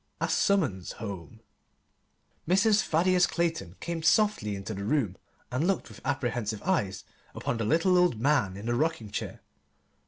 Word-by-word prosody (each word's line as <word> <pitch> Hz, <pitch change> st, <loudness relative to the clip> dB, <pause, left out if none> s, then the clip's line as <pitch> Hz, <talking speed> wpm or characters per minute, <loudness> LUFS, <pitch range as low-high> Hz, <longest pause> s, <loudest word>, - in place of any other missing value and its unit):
A -, -, 0 dB
Summons 140 Hz, -, +1 dB
Home 100 Hz, -8 st, -8 dB, 1.1 s
Mrs. 205 Hz, +4 st, +4 dB
Thaddeus 180 Hz, +1 st, +3 dB
Clayton 165 Hz, -, -2 dB
came 170 Hz, -1 st, -4 dB
softly 165 Hz, -, +2 dB
into 95 Hz, +2 st, -5 dB
the 100 Hz, 0 st, -5 dB
room 110 Hz, -5 st, 0 dB, 0.4 s
and 135 Hz, +7 st, 0 dB
looked 195 Hz, -2 st, 0 dB
with -, -, -13 dB
apprehensive 115 Hz, -5 st, -2 dB
eyes 100 Hz, -, 0 dB, 0.3 s
upon 120 Hz, -, -2 dB
the 115 Hz, -, -2 dB
little 165 Hz, -, +3 dB
old 175 Hz, -11 st, +2 dB
man 120 Hz, -8 st, +1 dB
in 100 Hz, -, -8 dB
the 120 Hz, -, 0 dB
rocking 120 Hz, -6 st, -1 dB
chair. -, -, -5 dB
135 Hz, 150 wpm, -28 LUFS, 105-175 Hz, 1.1 s, Mrs